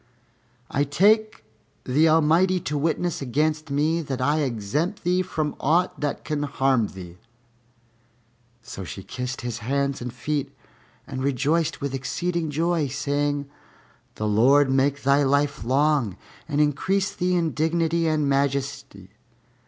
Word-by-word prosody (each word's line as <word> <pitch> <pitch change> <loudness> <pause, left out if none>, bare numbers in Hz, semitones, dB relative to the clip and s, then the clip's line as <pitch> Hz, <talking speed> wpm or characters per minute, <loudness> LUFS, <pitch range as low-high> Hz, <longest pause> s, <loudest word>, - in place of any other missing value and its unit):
I 140 - +1
take 210 +9 +2 0.4
the 150 +5 +3
Almighty 165 +4 +3
to 150 0 -3
witness 165 +3 -1
against 155 +4 -1
me 155 +4 +1
that 135 -4 -4
I 145 +4 +1
exempt 145 - -2
thee 180 +1 +2
from 155 -4 -3
aught 170 +6 +1
that 145 -1 -3
can 150 -1 -2
harm 135 -5 +1
thee." 90 -3 -11 1.4
So 95 - -8
she 95 +1 -8
kissed 125 +3 -5
his 120 -1 -4
hands 140 +4 -1
and 125 0 -4
feet 140 +3 -3 0.5
and 130 - -5
rejoiced 145 +4 0
with 140 -1 -3
exceeding 170 +5 -2
joy, 165 +1 0
saying, 145 +1 -1 0.7
"The 105 - -2
Lord 130 +6 +4
make 140 +2 +1
thy 140 +2 +4
life 140 +1 +1
long 135 -4 +1 0.3
and 145 -1 0
increase 185 +7 +1
thee 180 0 0
in 165 -3 +1
dignity 165 +1 0
and 155 -2 +1
majesty!" 135 -7 -2
145 Hz, 135 wpm, -24 LUFS, 135-160 Hz, 1.4 s, Lord